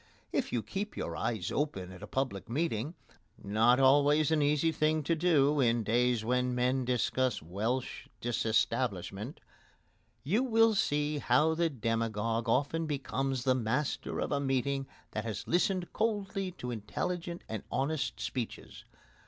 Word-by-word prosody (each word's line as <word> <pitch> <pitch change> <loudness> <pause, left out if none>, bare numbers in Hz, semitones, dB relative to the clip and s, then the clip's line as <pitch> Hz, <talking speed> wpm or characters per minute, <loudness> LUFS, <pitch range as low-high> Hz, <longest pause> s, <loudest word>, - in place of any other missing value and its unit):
If - - -1
you 120 -3 -1
keep 205 +2 -4
your - - -3
eyes 110 -6 -2
open 95 -12 -2
at 95 0 -11
a 105 - -7
public 130 -7 -2
meeting 145 +1 -1 0.4
not 115 +5 +3
always 145 +3 +5
an 155 -2 +3
easy 150 +2 +3
thing 155 0 +1
to 165 - +1
do 150 -4 +3
in 120 -3 +3
days 120 0 +2
when 125 +1 +1
men 125 +1 +1
discuss 125 -1 +1
Welsh 110 - -3
Disestablishment 115 - -1 0.8
you 195 - +2
will 225 -3 +4
see 150 -5 +1
how 145 +5 +3
the 165 +1 +1
demagogue 115 -2 -1
often 145 +6 +1
becomes 135 -3 -2
the 130 -1 +4
master 125 +4 -1
of - - -2
a 145 - +1
meeting 135 0 0 0.2
that 110 - -3
has 110 -3 -5
listened 180 +1 +1
coldly 200 -3 -1
to 125 -8 -6
intelligent 170 - -4
and 110 -2 -4
honest 145 +2 -1
speeches. 125 -4 -5
130 Hz, 145 wpm, -31 LUFS, 115-155 Hz, 0.8 s, always